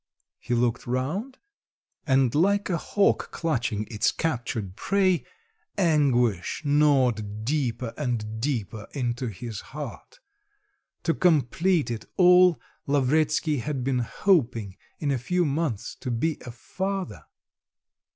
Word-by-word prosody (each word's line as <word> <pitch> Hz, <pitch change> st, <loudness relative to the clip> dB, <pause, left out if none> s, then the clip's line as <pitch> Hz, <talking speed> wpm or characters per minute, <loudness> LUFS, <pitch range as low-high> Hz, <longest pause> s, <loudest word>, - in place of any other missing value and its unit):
He 120 Hz, -, -2 dB
looked 120 Hz, 0 st, 0 dB
round, 155 Hz, -, -2 dB, 0.7 s
and 130 Hz, -3 st, +3 dB
like 200 Hz, +5 st, +2 dB
a 170 Hz, -, +1 dB
hawk 200 Hz, -1 st, +1 dB
clutching 120 Hz, -10 st, -1 dB
its 105 Hz, -, +2 dB
captured 115 Hz, -, -3 dB
prey, 190 Hz, -, +1 dB, 0.5 s
anguish 135 Hz, -, +2 dB
gnawed 125 Hz, -8 st, +2 dB
deeper 125 Hz, -4 st, -1 dB
and 110 Hz, -6 st, -3 dB
deeper 115 Hz, -6 st, -3 dB
into 125 Hz, -2 st, -2 dB
his 110 Hz, +1 st, -6 dB
heart. 150 Hz, -, -9 dB, 0.8 s
To 165 Hz, -, +2 dB
complete 160 Hz, -2 st, +2 dB
it 115 Hz, -2 st, -5 dB
all 180 Hz, -1 st, +6 dB, 0.3 s
Lavretsky 150 Hz, +2 st, +2 dB
had 135 Hz, 0 st, -3 dB
been 130 Hz, -1 st, 0 dB
hoping 120 Hz, -, +1 dB, 0.2 s
in 145 Hz, -2 st, -1 dB
a 135 Hz, -, 0 dB
few 180 Hz, +8 st, 0 dB
months 145 Hz, -7 st, -2 dB
to -, -, -6 dB
be 135 Hz, +7 st, -1 dB
a -, -, -5 dB
father.... 185 Hz, -, -4 dB
135 Hz, 115 wpm, -26 LUFS, 115-165 Hz, 0.8 s, all